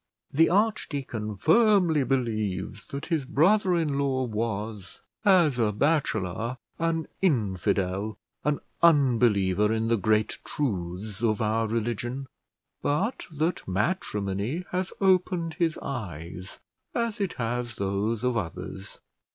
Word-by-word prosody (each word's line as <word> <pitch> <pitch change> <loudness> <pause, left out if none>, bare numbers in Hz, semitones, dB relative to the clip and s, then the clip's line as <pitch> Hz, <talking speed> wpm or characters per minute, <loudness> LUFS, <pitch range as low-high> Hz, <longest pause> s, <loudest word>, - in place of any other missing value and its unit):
The 160 +4 +4
archdeacon 145 - 0
firmly 175 - +4
believes 110 -5 -2
that 140 0 -5
his 165 -5 0
brother 185 +8 +3
in 150 -5 0
law 135 -2 +1
was, 110 -3 -4 0.2
as 175 - +4
a 110 -2 +3
bachelor, 115 - 0 0.2
an 165 -1 0
infidel, 100 - 0 0.3
an 150 -1 0 0.2
unbeliever 115 - +4
in 110 0 0
the 115 - +3
great 105 +2 +1
truths 100 -4 -3
of 110 -3 +2
our 110 +1 +1
religion; 120 +4 -2 0.6
but 190 - -1
that 160 +3 -1
matrimony 105 - -1
has 185 +1 -1
opened 180 -3 +2
his 165 -2 +1
eyes, 90 - -6 0.4
as 235 -3 -1
it 195 - 0
has 120 0 -3
those 100 +3 -1
of 125 -1 +1
others. 95 0 -6
120 Hz, 115 wpm, -27 LUFS, 105-160 Hz, 0.6 s, The